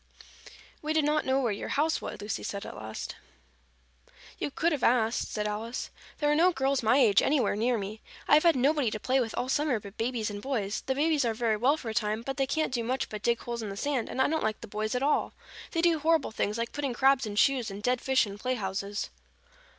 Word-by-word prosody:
"We 305 +1 -1
did 315 -2 +2
not 300 -1 +1
know 265 +1 +3
where 240 -5 +1
your 200 - -4
house 315 +3 +1
was," - - -5
said - - -10
Lucy 205 -1 -3
at 200 - -7
last. 110 0 -6 1.2
"You - - -1
could 330 +4 0
have 295 -5 -1
asked," 230 -1 +2
said 210 -1 -2
Alice. 220 +4 -4 0.3
"There 295 -1 +1
are - - +3
no 350 +4 +5
girls 270 -3 0
my 230 +3 +4
age 220 -8 +5
anywhere 280 -7 +2
near 235 +3 +1
me. 210 +2 -6 0.3
I - - +3
have 300 - +8
had 335 -1 +4
nobody 275 0 +2
to 215 - -4
play 260 +4 +1
with 230 -3 -2
all 245 - -1
summer 280 -3 +1
but 200 0 -12
babies 225 -2 -1
and 205 0 -6
boys. 220 -6 -2
The 265 - +1
babies 300 0 +2
are 230 -2 0
very 225 -1 +1
well 265 +7 +3
for 240 - -6
a - - -3
time, 215 0 -1
but 270 +2 -4
they 270 -1 +1
can't 310 -1 -1
do 235 -2 0
much 255 +3 -2
but 215 -1 -6
dig 235 +2 +1
holes 235 -1 -4
in 215 - -4
the 195 - -6
sand, 275 -1 -1
and - - -5
I 265 - +4
don't 320 +1 -1
like 215 0 -1
the 230 - -8
boys 215 +2 -3
at 250 - 0
all. 295 - +1 0.4
They 330 -1 -1
do 335 -2 +4
horrible 320 -3 +2
things, 210 0 -1
like 230 0 -2
putting 280 -4 -3
crabs 270 -2 +3
in 205 - -5
shoes 250 0 +3
and 200 +1 -8
dead 250 +1 +1
fish 265 -2 +3
in 200 0 -8
playhouses." 205 -4 -3
245 Hz, 245 wpm, -29 LUFS, 215-280 Hz, 1.2 s, have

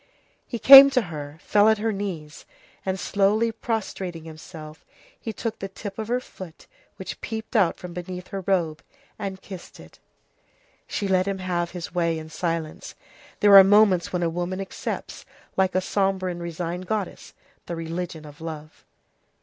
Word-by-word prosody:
He 240 - -4
came 275 +3 +11
to 265 -2 +2
her, 145 0 -7
fell 210 +1 +4
at 220 - +4
her 220 +2 -1
knees, 180 -7 -6 0.4
and 190 0 -2
slowly 210 +5 +2
prostrating 195 -7 -4
himself, 155 -1 -11 0.4
he 225 - -5
took 220 +1 -5
the 195 - -4
tip 195 +1 -8
of 220 - -3
her 245 +2 +1
foot 185 -9 -12 0.3
which 190 - -8
peeped 220 +2 -6
out 195 -6 +3
from 180 -1 -9
beneath 180 +1 -7
her 195 - -4
robe, 170 -5 0 0.4
and 195 -2 -5
kissed 185 -3 -10
it. - - -15 0.9
She 205 - -2
let 185 0 +2
him 195 -1 -1
have 175 -2 -2
his 175 -1 -7
way 170 -2 +1
in 160 0 -8
silence. 165 -1 -4 0.5
There 205 -1 +7
are 195 - +12
moments 195 -3 +4
when 180 -1 -1
a - - +2
woman 175 +2 -3
accepts, 195 - -5 0.3
like 190 -1 +1
a 185 - +3
sombre 190 -1 0
and 175 0 -7
resigned 170 +1 -4
goddess, 210 -3 -4 0.3
the 170 - -4
religion 165 -1 -5
of 145 +1 -13
love. 155 -1 -8
185 Hz, 165 wpm, -24 LUFS, 170-205 Hz, 0.9 s, are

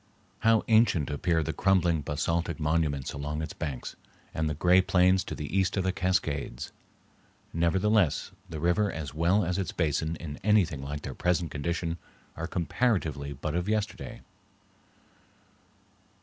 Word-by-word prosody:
How 115 -1 +4
ancient 110 -10 +4
appear 80 +2 +1
the 80 - -3
crumbling 90 -5 +2
basaltic 85 +3 -1
monuments 75 -3 0
along 75 +2 -3
its - - -5
banks, 70 -5 -5 0.4
and 80 -1 0
the 75 - -2
gray 90 +4 +5
plains 95 0 +3
to - - -5
the 75 +4 -5
east 95 0 +2
of 95 - +1
the 95 - +1
Cascades! 80 -9 -1 0.8
Nevertheless, 90 +1 +2 0.2
the 80 -2 -5
river 90 +5 +2
as 80 -3 -5
well 85 +6 +2
as 90 +3 -1
its 95 - -2
basin 80 0 0
in 75 -3 -7
anything 95 -8 +3
like 70 +1 -5
their 65 - -5
present 90 +2 0
condition 85 +3 -2 0.4
are 85 +1 -4
comparatively 85 - 0
but 75 +3 -4
of 90 +4 -1
yesterday. 110 -1 -2
85 Hz, 145 wpm, -28 LUFS, 75-95 Hz, 0.8 s, gray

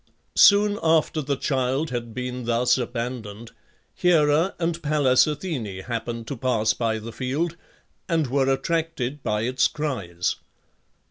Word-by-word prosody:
Soon 205 0 +6
after 160 -1 +2
the 140 0 -1
child 135 +2 -1
had 120 -2 -4
been 125 +1 -5
thus 120 +1 +3
abandoned, 120 -3 -5 0.4
Hera 165 0 +3
and 170 0 -2
Pallas 145 -4 +3
Athene 150 - -3 0.2
happened 115 0 -4
to 140 - -5
pass 115 -3 +1
by 115 -2 -1
the 110 +1 -7
field, 145 +8 -2 0.5
and 165 -3 +2
were 135 +1 +1
attracted 150 -2 -2
by 105 -3 -1
its 125 +3 +2
cries. 100 - -3
130 Hz, 130 wpm, -24 LUFS, 115-155 Hz, 0.5 s, Soon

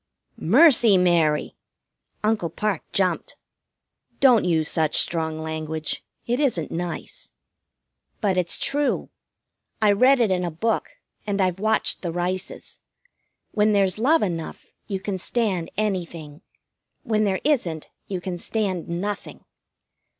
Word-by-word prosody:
"Mercy, 235 - +6
Mary!" 170 -4 +2 0.7
Uncle 210 -6 +1
Parke 200 +1 -3
jumped. 185 -4 0 0.8
"Don't 250 -7 +5
use 160 -3 +2
such 160 -2 +1
strong 160 -2 -1
language. 160 0 -4 0.2
It 245 +2 -1
isn't 245 - 0
nice." 175 0 -5 0.9
"But 195 -3 +1
it's 180 -2 0
true. 290 0 0 0.7
I 215 -2 +4
read 255 +6 +5
it 225 -5 +2
in 180 -1 +1
a 175 - -1
book, 195 +8 -2 0.3
and 205 -1 -1
I've 185 -1 +1
watched 220 +1 +1
the 175 - -3
Rices. 180 +2 -4 0.7
When 215 0 +2
there's 195 0 +2
love 310 +8 +3
enough 165 -5 -5
you 195 -3 -3
can 190 -1 -4
stand 195 -5 -1
anything. 170 -7 -3 0.6
When 215 -1 +1
there 195 -2 0
isn't, 185 - 0 0.2
you 185 -3 -4
can 175 -1 -5
stand 190 -5 -2
nothing. 195 +4 -4
185 Hz, 125 wpm, -23 LUFS, 170-215 Hz, 0.9 s, Mercy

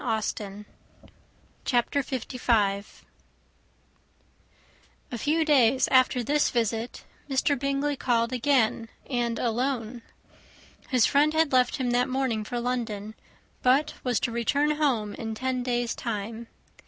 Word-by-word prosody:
] - - -29
CHAPTER 250 +3 +1
LV. 230 -6 0 2.2
A 240 - -3
few 315 +6 +1
days 265 -4 +4
after 255 -1 +3
this 295 +5 +2
visit, 230 0 -2 0.3
Mr. 275 0 +1
Bingley 275 +1 0
called 235 -1 +1
again, 235 -3 +1 0.2
and 240 -3 -1
alone. 240 0 -2 0.9
His 250 -5 +4
friend 300 +2 +3
had 320 -2 +3
left 250 -1 +3
him 250 -2 -1
that 245 +2 +2
morning 255 -4 -1
for 240 +3 -4
London, 225 -4 -3 0.5
but 270 +4 +3
was 245 -3 +1
to 235 - -1
return 280 +6 +1
home 235 -9 0
in 225 -1 -5
ten 255 +2 -2
days' 240 -1 -1
time. 225 0 -5
245 Hz, 115 wpm, -26 LUFS, 230-270 Hz, 2.2 s, days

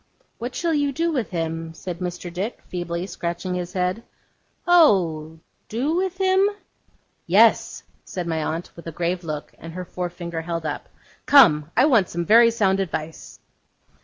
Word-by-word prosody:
'What 245 +2 -5
shall 335 -1 0
you 290 -2 +1
do 330 +4 0
with 255 -9 -2
him?' 165 -1 -4
said 175 0 -6
Mr. 180 -1 -5
Dick, 195 +7 -4
feebly, 175 0 -4
scratching 175 0 -4
his 180 0 -4
head. 185 +3 -1 0.6
'Oh! 175 - +3 0.3
do 265 +9 -1
with 370 0 -1
him?' 380 +1 +3 0.8
'Yes,' - - +4 0.2
said 180 -2 -5
my 160 -2 -1
aunt, 165 +3 -4
with 170 - -11
a - - -4
grave 175 +2 -2
look, 155 -2 -6
and 165 +1 -9
her 180 +1 -6
forefinger 175 -2 -5
held 165 -1 -4
up. 150 - -4 0.4
'Come! 165 - +6
I 255 - +6
want 230 - +3
some 170 0 -3
very 230 +3 +7
sound 195 -4 +1
advice. 160 -4 -5
180 Hz, 160 wpm, -23 LUFS, 165-235 Hz, 0.8 s, very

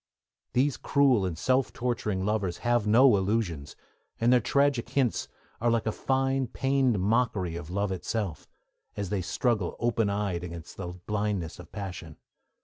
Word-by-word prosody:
These 135 +2 +2
cruel 130 -9 +3
and 85 -3 -4
self 130 +7 +1
torturing 110 -6 -2
lovers 100 -5 -1
have 120 -3 +2
no 120 +2 +6
illusions, 95 -7 -1 0.4
and 120 +2 +4
their 125 - +6
'tragic 140 -1 +1
hints' 130 -2 0 0.3
are 120 - +3
like 115 -1 +1
a 110 - +1
fine, 135 +2 0
pained 135 -2 +1
mockery 100 -4 +1
of 85 -2 -7
love 100 +2 -1
itself, 95 -2 -3 0.5
as 100 -3 -3
they 100 -2 0
struggle 105 +1 0
open 115 -3 +1
eyed 100 -4 -1
against 85 -2 -8
the 95 - -5
blindness 90 -1 -3
of 85 -1 -12
passion. 90 -6 -7
105 Hz, 150 wpm, -28 LUFS, 90-120 Hz, 0.5 s, no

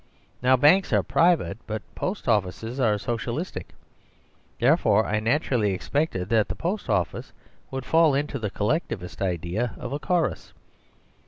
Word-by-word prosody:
Now, 130 +1 +4
banks 165 +9 +4
are - - +3
private; 170 -8 +2
but 110 -1 -4
post 190 -4 -4
offices 110 +3 0
are 110 -5 +3
Socialistic: 120 - -4 0.8
therefore 110 +2 +4
I 110 - 0
naturally 115 -3 +1
expected 95 - -2
that 110 -3 +3
the - - -3
post 190 +5 -3
office 95 -6 -1 0.4
would 135 -1 -5
fall 160 -3 +4
into 140 -1 -2
the 105 -2 -2
collectivist 105 - -2
idea 90 +5 -2
of 130 - -6
a 145 - -2
chorus. 175 0 -1
120 Hz, 140 wpm, -25 LUFS, 105-150 Hz, 0.8 s, Now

